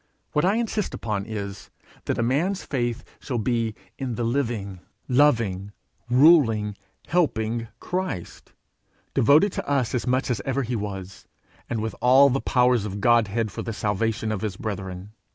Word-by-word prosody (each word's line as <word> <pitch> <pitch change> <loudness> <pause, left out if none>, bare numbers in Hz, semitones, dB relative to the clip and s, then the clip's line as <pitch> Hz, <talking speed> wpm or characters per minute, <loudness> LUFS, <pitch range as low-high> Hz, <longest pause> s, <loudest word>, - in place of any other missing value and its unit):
What 150 - +2
I 195 +3 +3
insist 225 -3 -1
upon 105 -3 -3
is, 100 -3 -6 0.4
that - - -1
a 115 - +1
man's 165 +11 0
faith 120 -4 -2 0.2
shall 125 - -3
be 115 -1 0 0.2
in 130 -4 -3
the 120 - -2
living, 115 -6 -2 0.3
loving, 115 -8 +2 0.4
ruling, 120 -7 +5 0.3
helping 115 -9 0
Christ, 180 - -4 0.6
devoted 150 - +5
to - - -5
us 135 -5 +1
as 125 0 -1
much 130 +1 +1
as 115 -5 -1
ever 135 +1 -1
he 120 +1 -2
was, 95 -3 -6 0.4
and 115 -2 -1
with 110 - -3
all 135 +2 +6
the 135 - 0
powers 125 -3 +3
of 100 - -4
the - - -5
Godhead 115 0 +2
for - - -5
the 115 - -4
salvation 110 +2 -1
of 105 - -2
his 105 -4 -3
brethren. 95 -2 -5
115 Hz, 160 wpm, -24 LUFS, 105-135 Hz, 0.6 s, all